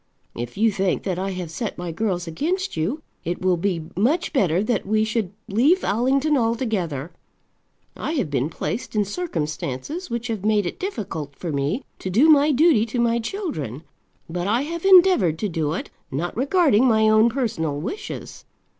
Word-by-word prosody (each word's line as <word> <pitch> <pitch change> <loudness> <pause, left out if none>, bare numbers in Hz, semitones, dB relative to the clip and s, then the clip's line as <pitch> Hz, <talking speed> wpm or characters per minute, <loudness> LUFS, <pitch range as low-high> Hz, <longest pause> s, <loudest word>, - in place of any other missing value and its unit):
If 120 +5 -6
you 220 +1 +3
think 190 -2 0
that 185 -3 -2
I 195 +1 -2
have 180 -3 -5
set 210 +5 -4
my 175 -1 -4
girls 180 0 -1
against 340 - -2
you, 200 - -2 0.2
it 175 +1 -3
will 185 -1 +2
be 175 -2 -1
much 295 - +1
better 185 - +2
that 215 -2 0
we 215 +1 +2
should 220 -4 -1 0.2
leave 280 - +3
Allington 265 +8 +2
altogether. 220 - -1 0.8
I 310 - -3
have 245 - -1
been 140 +1 0
placed 220 +8 -4
in 210 -1 +2
circumstances 190 - -4
which 235 0 -3
have 220 -5 -3
made 210 -2 +2
it 175 - -4
difficult 175 - -5
for 170 +2 -5
me 145 - -1 0.2
to 185 - -4
do 245 - +4
my 300 0 +6
duty 290 -4 +4
to 240 +2 -3
my 235 0 +2
children; 220 - -4 0.4
but 175 +2 -3
I 235 +6 +2
have 335 +4 -5
endeavoured 360 - +6
to 210 +4 -2
do 160 -3 -1
it, 185 - -5 0.2
not 160 +6 -3
regarding 270 - +3
my 220 -2 +4
own 215 +2 +5
personal 180 - -2
wishes. 240 - -6
215 Hz, 175 wpm, -23 LUFS, 170-265 Hz, 0.8 s, my